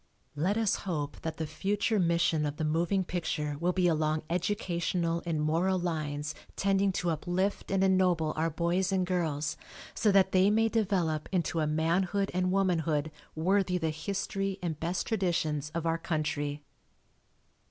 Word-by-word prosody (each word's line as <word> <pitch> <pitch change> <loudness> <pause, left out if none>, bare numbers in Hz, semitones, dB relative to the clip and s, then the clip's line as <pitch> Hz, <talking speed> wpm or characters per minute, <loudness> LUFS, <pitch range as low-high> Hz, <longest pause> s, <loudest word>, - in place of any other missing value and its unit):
Let 180 +8 +1
us 220 -3 +2
hope 145 -4 -3
that 160 -1 -4
the 160 - -2
future 200 +7 0
mission 170 -3 +2
of 145 - -4
the - - -2
moving 170 +5 +1
picture 160 -4 -2
will 175 +2 +2
be 180 -1 +2
along 155 -1 +1
educational 175 -2 -1
and 160 -2 0
moral 165 +5 +1
lines 155 -4 -2 0.2
tending 195 0 +2
to 180 -2 0
uplift 180 +5 -1
and 195 0 +2
ennoble 180 -5 +3
our 160 +1 +1
boys 175 +4 0
and 190 -1 +1
girls 160 -5 -1 0.4
so 210 - +2
that 195 -1 +4
they 190 +1 +5
may 225 +2 +3
develop 185 -9 0
into 175 -3 0
a 155 - +1
manhood 175 +6 +1
and 185 0 +1
womanhood 165 -6 +1 0.2
worthy 180 +2 +2
the 160 -2 -1
history 195 +3 -3
and 165 -4 -3
best 170 +3 -1
traditions 165 -8 0
of 170 -1 -2
our 165 0 +1
country. 150 -3 -2
170 Hz, 155 wpm, -30 LUFS, 155-190 Hz, 0.4 s, they